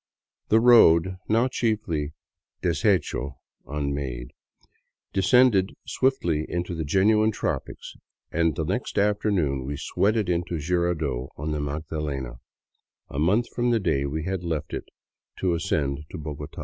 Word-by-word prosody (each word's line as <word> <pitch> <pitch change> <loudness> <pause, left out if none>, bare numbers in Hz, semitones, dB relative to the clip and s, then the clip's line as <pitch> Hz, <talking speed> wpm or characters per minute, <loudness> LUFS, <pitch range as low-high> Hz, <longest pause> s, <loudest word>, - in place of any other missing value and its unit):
The 110 - +5
road, 95 -7 +6
now 115 +4 +3
chiefly 105 - -1 0.5
deshecho 85 - 0 0.3
("unmade"), 70 -4 -3 0.8
descended 100 0 +4
swiftly 85 - +1
into 85 0 -2
the 80 -1 -3
genuine 105 +7 +3
tropics 110 - -4 0.4
and 80 -3 +1
the 80 - -2
next 100 +9 -3
afternoon 100 -9 +1
we 70 +2 -4
sweated 105 +6 +1
into 85 0 -1
Jirardot 80 -5 -1
on 75 +2 -3
the 75 - -1
Magdalena, 75 -4 -4 0.7
a 70 - -4
month 105 +10 +2
from 120 0 +1
the 115 -1 +3
day 75 -8 0
we 80 +3 -3
had 95 0 -3
left 80 -3 -3
it - - -5 0.5
to 90 -2 +1
ascend 75 -4 -1
to - - -7
Bogota. 75 -1 -7
85 Hz, 130 wpm, -25 LUFS, 75-100 Hz, 0.8 s, road